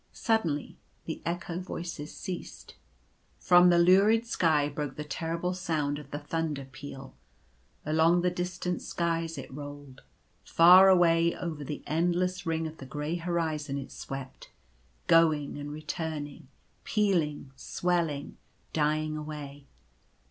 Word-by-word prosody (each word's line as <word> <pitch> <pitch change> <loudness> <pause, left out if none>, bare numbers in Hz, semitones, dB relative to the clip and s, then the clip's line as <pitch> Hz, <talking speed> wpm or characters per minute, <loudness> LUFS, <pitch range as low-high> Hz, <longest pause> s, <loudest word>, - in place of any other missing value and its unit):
Suddenly 175 - -1 0.3
the 160 - -5
echo 175 0 -3
voices 170 -4 -6
ceased. 185 -3 -7 0.6
From 180 0 +6
the 175 - +5
lurid 195 +6 +5
sky 155 -9 +2
broke 145 0 -4
the 150 - -5
terrible 165 +4 -3
sound 155 -5 -1
of 145 -2 -12
the 145 - -4
thunder 150 -2 -3
peal. 135 0 -10 0.7
Along 160 +3 +3
the 180 - +2
distant 180 0 -3
skies 165 -1 -2
it 135 -1 -8
rolled. 145 -2 -9 0.4
Far 180 +3 +8
away 170 -2 +4
over 160 -4 -5
the 145 +1 -6
endless 175 +3 0
ring 165 0 0
of 160 0 -6
the 135 - -10
grey 150 +5 -3
horizon 160 -4 -2
it 135 - -7
swept 135 -1 -8 0.3
— 60 +2 -36
going 155 -3 +3
and 145 0 -6
returning 155 -1 -5 0.2
— - - -40
pealing 170 -10 0
— - - -34
swelling 165 0 -2 0.2
— - - -38
dying 155 0 0
away. 145 -2 -7
160 Hz, 135 wpm, -29 LUFS, 145-175 Hz, 0.7 s, Far